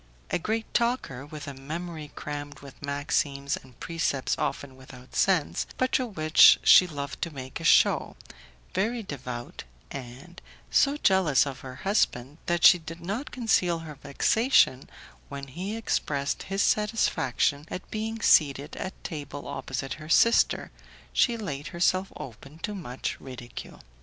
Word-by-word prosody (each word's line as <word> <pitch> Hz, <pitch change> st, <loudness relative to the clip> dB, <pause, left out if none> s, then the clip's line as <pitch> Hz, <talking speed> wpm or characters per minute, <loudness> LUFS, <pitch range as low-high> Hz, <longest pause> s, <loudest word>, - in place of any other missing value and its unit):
A -, -, +1 dB
great 220 Hz, +5 st, -3 dB
talker, 235 Hz, -, -1 dB
with 150 Hz, -1 st, -8 dB
a 140 Hz, -, -5 dB
memory 155 Hz, +2 st, -6 dB
crammed 145 Hz, -1 st, -6 dB
with 140 Hz, -2 st, -13 dB
maxims 140 Hz, -1 st, -1 dB
and 130 Hz, -2 st, -14 dB
precepts 165 Hz, -5 st, -1 dB
often 135 Hz, -1 st, -3 dB
without 130 Hz, -1 st, -14 dB
sense, 180 Hz, -6 st, +1 dB
but 255 Hz, +1 st, +2 dB
of 240 Hz, -7 st, -5 dB
which 155 Hz, 0 st, +7 dB
she 180 Hz, -, +8 dB
loved 140 Hz, -3 st, -6 dB
to 170 Hz, -, -1 dB
make 130 Hz, -3 st, -7 dB
a -, -, -8 dB
show, -, -, +4 dB, 0.6 s
very 225 Hz, +4 st, 0 dB
devout, 125 Hz, -7 st, -7 dB, 0.3 s
and 135 Hz, +8 st, -9 dB, 0.3 s
so 285 Hz, +1 st, +3 dB
jealous 190 Hz, -, +3 dB
of 135 Hz, -2 st, -6 dB
her 130 Hz, -1 st, -9 dB
husband 150 Hz, -, 0 dB
that 175 Hz, 0 st, +2 dB
she 180 Hz, -, +9 dB
did 165 Hz, +1 st, -9 dB
not 200 Hz, -, -4 dB
conceal 190 Hz, -8 st, +1 dB
her 150 Hz, -, -7 dB
vexation 145 Hz, -, +2 dB, 0.4 s
when 140 Hz, 0 st, -6 dB
he 185 Hz, -, -4 dB
expressed 140 Hz, -10 st, -1 dB
his 195 Hz, +1 st, +1 dB
satisfaction 155 Hz, -, +1 dB
at 185 Hz, -, -7 dB
being 220 Hz, +1 st, -3 dB
seated 145 Hz, -1 st, +4 dB
at 185 Hz, -, -6 dB
table 145 Hz, -3 st, -6 dB
opposite 135 Hz, 0 st, -4 dB
her 155 Hz, -, -9 dB
sister, 230 Hz, +7 st, +4 dB, 0.4 s
she 240 Hz, -2 st, +3 dB
laid 155 Hz, -8 st, -5 dB
herself 185 Hz, +3 st, +1 dB
open 135 Hz, +5 st, -10 dB
to 210 Hz, +5 st, -4 dB
much 135 Hz, -10 st, -5 dB
ridicule. 125 Hz, -3 st, -9 dB
155 Hz, 145 wpm, -27 LUFS, 140-190 Hz, 0.6 s, she